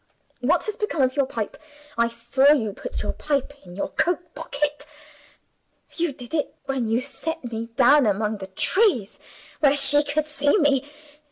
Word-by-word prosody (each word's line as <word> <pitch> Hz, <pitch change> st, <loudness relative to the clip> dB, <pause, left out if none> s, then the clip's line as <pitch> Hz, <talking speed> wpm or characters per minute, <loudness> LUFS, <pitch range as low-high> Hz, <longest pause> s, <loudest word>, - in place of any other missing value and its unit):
What 305 Hz, +8 st, +2 dB
has 430 Hz, -, -4 dB
become 420 Hz, -, 0 dB
of 255 Hz, 0 st, +1 dB
your 280 Hz, -2 st, +1 dB
pipe? 225 Hz, -5 st, -5 dB, 0.4 s
I 235 Hz, 0 st, +2 dB
saw 240 Hz, +5 st, +3 dB
you 220 Hz, -8 st, -1 dB
put -, -, -6 dB
your -, -, -2 dB
pipe 285 Hz, -2 st, -2 dB
in 175 Hz, -1 st, -12 dB
your 200 Hz, -, -3 dB
coat 350 Hz, 0 st, -1 dB
pocket. 295 Hz, +1 st, -3 dB, 1.1 s
You 340 Hz, -2 st, 0 dB
did 250 Hz, -1 st, -12 dB
it 305 Hz, -3 st, -1 dB
when 270 Hz, -4 st, -2 dB
you 225 Hz, +3 st, +1 dB
set 285 Hz, -1 st, -6 dB
me 225 Hz, 0 st, -4 dB
down 270 Hz, 0 st, +5 dB
among 210 Hz, +1 st, -1 dB
the 190 Hz, -, -7 dB
trees 245 Hz, -, +1 dB, 0.4 s
where 285 Hz, -1 st, +4 dB
she 290 Hz, +1 st, +7 dB
could 295 Hz, +1 st, -1 dB
see 295 Hz, +2 st, +1 dB
me! 290 Hz, -4 st, +2 dB
275 Hz, 170 wpm, -23 LUFS, 235-300 Hz, 1.1 s, she